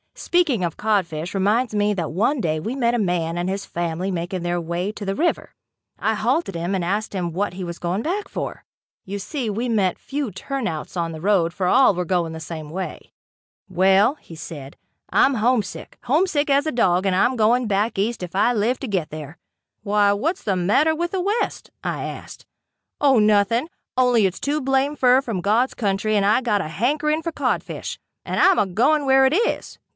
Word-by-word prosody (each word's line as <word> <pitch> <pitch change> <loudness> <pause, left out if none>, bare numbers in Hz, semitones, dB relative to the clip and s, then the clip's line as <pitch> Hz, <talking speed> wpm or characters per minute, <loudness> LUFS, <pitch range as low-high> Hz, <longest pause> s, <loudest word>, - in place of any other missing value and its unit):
Speaking 305 - +1
of 170 -2 -2
codfish, 180 -6 -1
reminds 210 +5 +1
me 210 0 +2
that 170 -5 -3
one 230 - +1
day 155 -2 0
we 225 +11 -4
met 240 -3 +1
a 240 - +1
man 175 -4 -1
and 175 +1 -1
his 195 +1 -3
family 175 +2 -3
making 175 +1 -3
their 175 0 -1
way 170 +4 -2
to 210 -1 -8
the 195 0 -1
river. 340 - -1 0.4
I - - 0
halted 330 - 0
him 170 +3 -2
and 180 -3 -1
asked 205 +4 -2
him 175 -3 -2
what 195 +1 -1
he 185 +1 -6
was 170 -1 -6
going 180 +4 -1
back 400 +5 -2
for. - - -5 0.4
You 200 +2 -5
see 245 +3 -3
we 225 +4 -2
met 200 -5 +1
few 275 -4 -4
"turnouts" 195 - -4
on 170 -1 -1
the 160 -1 -8
road 180 -3 +2
for 185 - -2
all 245 +2 +5
were 180 0 -2
going 170 -2 0
the 160 - -6
same 160 -1 -7
way. 185 +4 -6 0.6
"Well," 190 - +3 0.2
said 145 -3 -9
he, - - -47 0.2
"I'm 275 - +3
homesick 230 -2 -1
homesick 300 +2 +1
as 280 +1 +3
a - - +1
dog 185 -6 +2
and 190 -1 +2
I'm 245 +7 +3
going 240 +2 +3
back 205 +2 0
east 215 +3 -1
if 180 0 -7
I 220 +5 +3
live 235 +3 0
to 270 - -4
get 185 -7 -1
there." 155 0 -8 0.4
"Why 205 -1 +3
what's 320 - -2
the 195 - 0
matter 210 - +3
with 345 +2 -2
the 380 - -1
west?" 410 +5 -2
I - - -3
asked. - - -9 0.5
"Oh 275 -3 +4
nothing, 215 +6 +3 0.3
only 245 -4 +4
it's 185 - -6
too 295 +2 -1
blamed 270 +2 0
fur 255 +1 +5
from 225 -9 -3
God's 225 +7 +2
country 210 0 0
and 200 -1 +2
I 215 +5 +3
got 215 -5 +1
to 175 - -3
hankering 300 - 0
fer 335 - -3
codfish - - -3 0.3
and - - -2
I'm 385 -1 +5
agoin' 240 +10 +2
where 265 0 +5
it 265 - +3
is. 455 +7 -1
205 Hz, 200 wpm, -22 LUFS, 180-260 Hz, 0.6 s, all